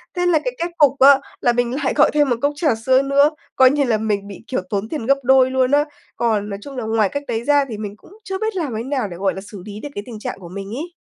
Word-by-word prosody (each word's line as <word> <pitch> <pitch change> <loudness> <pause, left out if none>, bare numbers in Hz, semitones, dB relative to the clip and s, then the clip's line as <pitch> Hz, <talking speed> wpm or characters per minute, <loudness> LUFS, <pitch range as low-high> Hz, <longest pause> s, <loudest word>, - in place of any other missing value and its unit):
Thế 355 0 0
là 345 -3 +4
cái - - -1
kết 345 - -3
cục 280 -2 +4
á 275 +1 +7 0.2
là 240 - +3
mình 245 +1 0
lại - - +1
gọi 300 - +4
thêm 295 -2 +3
1 245 - +2
cốc 285 +1 +1
trà 300 -5 +1
sữa 260 +4 +3
nữa, 280 +1 +4 0.3
coi 260 -1 +6
như 290 0 +1
là 235 -5 +1
mình 210 -2 -2
bị, 200 0 -10
kiểu, 255 - -2
tốn 205 +1 -2
tiền 295 -8 -4
gấp 275 +3 +3
đôi 260 0 +4
luôn 260 0 +1
á. 290 +1 +4 0.3
Còn 215 -3 0
nói 200 -1 -5
chung 275 +4 -9
là 245 - -3
ngoài 220 -2 +1
cách 285 +6 -4
đấy 225 0 -2
ra 285 +1 +3
thì 220 - -5
mình 205 -1 -6
cũng 395 - -18
chưa 385 -2 -4
biết 440 -1 -2
làm 315 -9 -2
thế 225 - -3
nào 260 -4 -2
để, 175 -3 -9
gọi 190 +1 0
là, 190 - -7
xử 200 -1 -11
lý 210 0 -8
được 290 - -7
cái 205 - -4
tình 225 -3 -9
trạng 210 - -5
của 175 -3 -11
mình 195 +2 -7
ấy. 340 +5 -6
255 Hz, 305 wpm, -20 LUFS, 215-285 Hz, 0.3 s, á